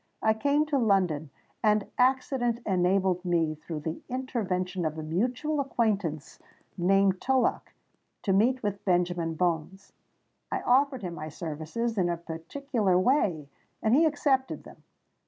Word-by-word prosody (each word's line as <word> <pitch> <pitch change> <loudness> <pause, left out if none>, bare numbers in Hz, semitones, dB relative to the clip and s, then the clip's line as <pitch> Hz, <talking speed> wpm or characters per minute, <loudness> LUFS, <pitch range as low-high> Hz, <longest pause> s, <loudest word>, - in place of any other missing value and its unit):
I 220 - +4
came 285 +6 +1
to 295 -3 0
London; 185 - +1 0.3
and 210 -2 +3
accident 255 -2 +2
enabled 185 -1 +1
me, 170 -3 +1
through 155 0 -7
the 160 +2 -4
intervention 195 -8 -2
of 155 -1 -2
a 155 - -4
mutual 250 - -1
acquaintance 210 - -1 0.4
named 190 +1 +2
Tullock, 265 -1 0 0.5
to 195 - +1
meet 245 +6 +2
with 200 -1 -3
Benjamin 175 -3 0
Bones. 180 +3 -2 0.6
I - - -1
offered 260 -1 +2
him 175 -2 -4
my 155 -1 -6
services 165 +9 -3
in 175 -2 +2
a 170 - -1
particular 185 - -1
way—and 185 - 0
he 315 +5 +5
accepted 285 -3 0
them. - - -14
195 Hz, 135 wpm, -28 LUFS, 170-250 Hz, 0.6 s, he